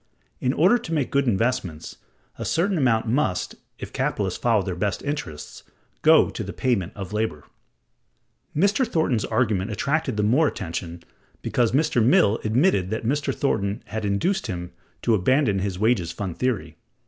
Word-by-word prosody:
In 125 - +1
order 185 - +4
to 165 - -6
make 145 -5 -1
good 140 -1 +2
investments, 95 -7 -1 0.4
a - - -3
certain 190 +4 +1
amount 120 -5 +2
must, 110 - 0 0.2
if - - -8
capitalists - - -1
follow 115 -4 +2
their 95 -1 -3
best 100 +2 -2
interests, 140 - -5 0.4
go - - +5
to - - -5
the - - -6
payment 110 -7 -1
of 100 0 -7
labor.(162) 85 - -7
Mr. 215 +6 +3
Thornton's 135 -9 0
argument 105 -5 0
attracted 135 +3 -1
the 105 - +1
more 130 +9 +4
attention 85 -5 -5 0.4
because 120 -2 +1
Mr. 135 -5 +2
Mill(163) 110 -3 +3
admitted 110 - +2
that 110 +2 -3
Mr. 140 +4 0
Thornton 105 -7 -1
had 110 0 -5
induced 145 - 0
him 90 -3 -5 0.3
to 115 - +3
abandon 110 +1 +2
his 95 -1 -2
Wages 105 -5 +1
Fund 95 -5 -5
Theory. 95 -11 -2
110 Hz, 160 wpm, -24 LUFS, 95-140 Hz, 0.4 s, go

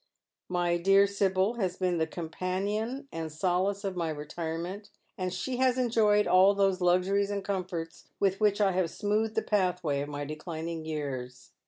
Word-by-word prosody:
My 175 -1 +1
dear 195 +3 +5
Sibyl 200 +2 +1
has 185 -3 -1
been 180 -2 0
the 160 - +1
companion 195 - -3
and 160 -1 -5
solace 185 +5 0
of 195 -2 -3
my 170 -2 -1
retirement, 165 +6 -5 0.3
and 185 -1 -2
she 245 +8 -3
has 255 0 +3
enjoyed 220 -4 +3
all 190 +2 +5
those 195 -1 +2
luxuries 185 +3 +2
and 200 -1 -3
comforts 180 -4 -4
^vith 195 -1 +1
which 210 -1 +3
I 200 -2 +4
have 180 -2 0
smoothed 215 +4 -1
the 220 - +1
pathway 180 -8 0
of 145 - -4
my 145 0 -4
declining 160 +2 -5
years. 130 -5 -5
185 Hz, 165 wpm, -29 LUFS, 165-200 Hz, 0.3 s, dear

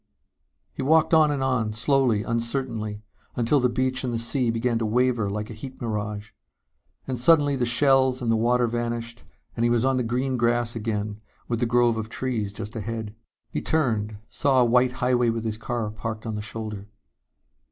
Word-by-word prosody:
He - - -5
walked 160 +4 +3
on 155 -1 +6
and 140 -2 -1
on, 120 -5 0
slowly, 125 -2 +2
uncertainly, 115 -3 -2 0.3
until 120 +4 +2
the 125 -1 +2
beach 130 +1 0
and 125 - -1
the 115 - -1
sea 120 +2 0
began 115 +1 0
to 115 - -1
waver 120 -2 +1
like 105 +2 -4
a - - -6
heat 130 +5 -9
mirage. 105 -2 -4 0.7
And 130 -2 -2
suddenly 145 +1 +5
the 125 -2 0
shells 130 0 +3
and 120 -3 0
the - - +3
water 120 +2 +2
vanished 115 0 -3 0.3
and 115 - -1
he 120 - +3
was 120 +1 +2
on 135 -1 +2
the 125 - +1
green 125 +3 -1
grass 120 0 +1
again 105 -1 -3 0.3
with 115 -2 -1
the 120 - +1
grove 120 -1 +3
of 110 0 -4
trees 115 -5 -2
just 110 +2 -7
ahead. 110 -1 -4 0.4
He - - -2
turned, 110 -9 0
saw 135 -2 +2
a - - +5
white 125 +1 +3
highway 125 -1 +1
with 115 -1 -2
his 110 -1 -3
car 115 -2 -3
parked 110 +1 -6
on 110 - -3
the 105 - -3
shoulder. 105 -2 -6
120 Hz, 190 wpm, -25 LUFS, 110-130 Hz, 0.7 s, on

